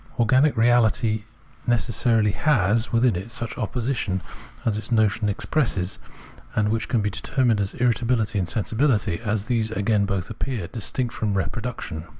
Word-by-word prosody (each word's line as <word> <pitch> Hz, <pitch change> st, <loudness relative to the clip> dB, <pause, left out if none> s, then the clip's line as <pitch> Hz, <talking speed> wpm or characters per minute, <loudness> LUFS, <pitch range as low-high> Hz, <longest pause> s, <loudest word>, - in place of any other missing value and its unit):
Organic 130 Hz, +6 st, +4 dB
reahty 115 Hz, -2 st, +2 dB, 0.4 s
necessarily 115 Hz, -2 st, +2 dB
has 115 Hz, -5 st, +2 dB
within 115 Hz, -2 st, +3 dB
it 95 Hz, +6 st, -5 dB
such 115 Hz, -1 st, -5 dB
an -, -, -5 dB
opposition 110 Hz, -5 st, -2 dB, 0.4 s
as 110 Hz, -, +1 dB
its 110 Hz, -, -7 dB
notion 110 Hz, -1 st, +2 dB
expresses, 100 Hz, -4 st, -1 dB, 0.6 s
and 105 Hz, -1 st, +2 dB
which 110 Hz, 0 st, -1 dB
can 115 Hz, -, +2 dB
be 105 Hz, 0 st, -1 dB
determined 120 Hz, 0 st, +1 dB
as 100 Hz, -, -2 dB
irritabihty 115 Hz, -3 st, +1 dB
and 90 Hz, -, -1 dB
sensibihty, 110 Hz, -, 0 dB
as 110 Hz, -2 st, -2 dB
these 115 Hz, -2 st, 0 dB
again 105 Hz, -1 st, +1 dB
both 95 Hz, 0 st, -2 dB
appear 115 Hz, -3 st, -3 dB
distinct 120 Hz, +4 st, -3 dB
from 105 Hz, -3 st, -1 dB
reproduction. 95 Hz, -6 st, -4 dB
110 Hz, 150 wpm, -24 LUFS, 105-120 Hz, 0.6 s, Organic